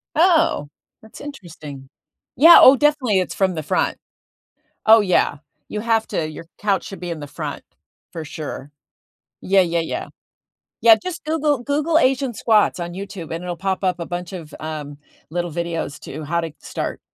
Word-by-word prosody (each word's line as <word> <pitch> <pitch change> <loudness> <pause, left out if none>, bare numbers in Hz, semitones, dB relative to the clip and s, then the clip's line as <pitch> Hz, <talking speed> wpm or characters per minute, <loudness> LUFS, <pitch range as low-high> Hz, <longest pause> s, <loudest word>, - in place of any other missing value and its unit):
Oh, 325 - +3 0.3
that's 220 - -14
interesting. 155 - -10 0.5
Yeah, 330 +5 +9
oh, 265 - +9
definitely, 270 -8 +2
it's 185 - -3
from 190 -2 +1
the 155 - -4
front. - - 0 0.9
Oh 220 0 +8
yeah, 185 -6 +2 0.3
you 210 - -4
have 225 -1 +1
to, 155 -1 -2
your 155 +2 -9
couch 200 -3 0
should 195 - -8
be 175 0 -6
in 165 -2 -4
the 145 - -7
front, 145 - -6 0.5
for 165 - -6
sure. 150 -2 -7 0.7
Yeah, 195 +1 +3
yeah, 170 -2 +1
yeah. 165 - -4 0.7
Yeah, 230 -1 +8
just 365 -2 -6
Google 300 -4 0
Google 295 +4 +1
asian 265 -3 +2
squats 215 -3 +2
on 175 0 -5
YouTube 190 -3 -7
and 165 +2 -5
it'll 175 -1 -4
pop 190 +1 -2
up 180 -2 0
a 170 - -4
bunch 175 +1 -6
of, 165 -4 -8
um, 150 -2 -6 0.3
little 175 +1 -3
videos 170 -2 -4
to 155 +3 -7
how 170 +3 -1
to 165 -1 -5
start - - -5
185 Hz, 170 wpm, -21 LUFS, 165-235 Hz, 0.9 s, Yeah